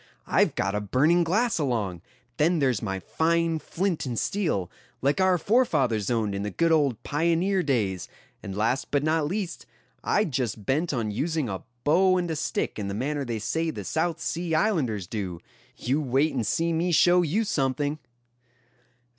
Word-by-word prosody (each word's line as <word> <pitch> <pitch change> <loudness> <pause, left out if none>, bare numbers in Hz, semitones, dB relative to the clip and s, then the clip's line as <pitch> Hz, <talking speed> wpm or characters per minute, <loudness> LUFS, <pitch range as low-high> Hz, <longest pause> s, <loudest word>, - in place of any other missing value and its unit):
I've - - +2
got 100 +1 0
a 105 - -1
burning 150 - +3
glass 215 +6 +1
along; 110 - -1 0.4
then 165 +4 +3
there's 130 -7 +1
my 95 -3 -3
fine 165 - 0
flint 180 +1 -2
and 120 -2 -3
steel, 160 - -1 0.3
like 140 +7 +1
our 185 -1 +4
forefathers 155 - +2
owned 110 -4 0
in 100 - -3
the 105 - -2
good 165 - +1
old 140 -8 +2
pioneer 170 +5 +1
days; 105 - -1 0.3
and 95 0 -6
last 115 +5 0
but 145 0 +1
not 155 -1 +1
least, 185 0 -4 0.4
I'd 205 -6 +1
just 120 -5 -2
bent 155 - +1
on 115 -6 -1
using 155 +5 -1
a 95 -2 -4 0.2
bow 185 +5 +4
and 175 -2 -1
a - - -1
stick 155 -6 -2
in 100 - -3
the 100 - -3
manner 145 +5 -2
they 120 -3 -3
say 160 +10 -1
the - - -5
South 160 +1 -1
Sea 170 -1 -2
islanders 145 - +1
do. 95 -3 -4 0.4
You 135 +6 0
wait 140 +3 +1
and 120 -6 -1
see 165 +9 +1
me 170 +2 0
show 175 +2 +5
you 175 +7 +1
something." 145 - -1
150 Hz, 175 wpm, -26 LUFS, 115-170 Hz, 0.4 s, show